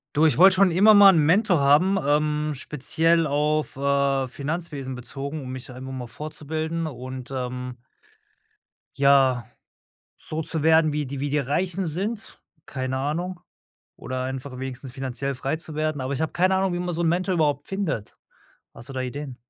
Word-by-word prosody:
Du, 160 +2 +5
ich 155 - +1
wollte 190 +3 +7
schon 195 0 +5
immer 200 +6 +6
mal 205 -1 +9
'n 180 - +2
Mentor 180 0 +3
haben, 150 +8 +4
ähm, 150 +1 +1
speziell 160 +4 +1
auf, 150 +1 0
äh, 140 -1 +1
Finanzwesen 145 -1 -4
bezogen, 140 +4 -6
um 130 -1 -7
mich 130 +1 -8
einfach 130 +1 -8
mal 130 -2 -5
fortzubilden 155 +6 -4
und, 130 -2 -7
ähm 125 -1 -4 1.2
ja, 135 -4 +4 0.7
so 155 +1 -4
zu 160 0 -2
werden, 160 -1 +4
wie 150 -1 -2
die 135 +1 -6
wie 145 +1 -2
die 150 - +1
Reichen 175 +7 -1
sind, 200 +8 -4 0.2
keine 130 -1 -3
Ahnung. 175 +6 -3 0.6
Oder 130 0 -4
einfach 130 0 -5
wenigstens 130 0 -6
finanziell 135 +1 -4
frei 135 +4 -2
zu 160 -1 -9
werden. 155 -1 -1
Aber 130 +1 -3
ich 140 - -3
habe 160 - -1
keine 185 +2 +2
Ahnung, 190 -1 0
wie - - -2
man 180 -1 -3
so 165 - -3
'n 165 - +2
Mentor 180 +3 0
überhaupt 145 -4 +1
findet. 190 - -3 0.6
Hast 115 +3 -12
du - - -7
da 130 - -2
Ideen? 130 +1 -6
145 Hz, 175 wpm, -24 LUFS, 130-165 Hz, 1.2 s, mal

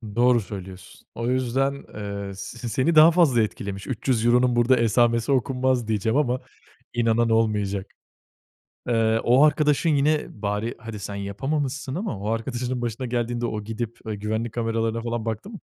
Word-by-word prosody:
Doğru 120 -1 +4
söylüyorsun. 95 -1 -10
O 115 +1 -3
yüzden, 130 +2 +1 0.2
ııı, 100 -2 -6
s 120 +5 -7
seni 145 +9 +1
daha 155 +2 +9
fazla 150 -9 +4
etkilemiş. 100 -2 -4
€300'nun 125 0 +2
burada 120 +2 +4
esamesi 115 +2 +2
okunmaz 130 -2 +1
diyeceğim 110 +4 0
ama 130 -3 +1 0.5
inanan 115 0 +2
olmayacak. 105 -3 +1 1.0
Eee, 115 -1 +2
o 125 +4 +5
arkadaşın 150 +1 +3
yine 150 +1 +2 0.2
bari 105 +3 -2
hadi 115 -2 -7
sen 100 +1 -6
yapamamışsın 135 +7 -3
ama 180 - -3
o 105 - -4
arkadaşının 120 +2 -2
başına 120 +2 -3
geldiğinde 120 0 -1
o 105 -2 -4
gidip, 115 +1 -5
eee, 110 - -2
güvenlik 110 +2 -3
kameralarına 115 -1 -1
falan 120 -1 -3
baktı 115 - -4
mı? 210 - -9
115 Hz, 150 wpm, -24 LUFS, 110-130 Hz, 1.0 s, daha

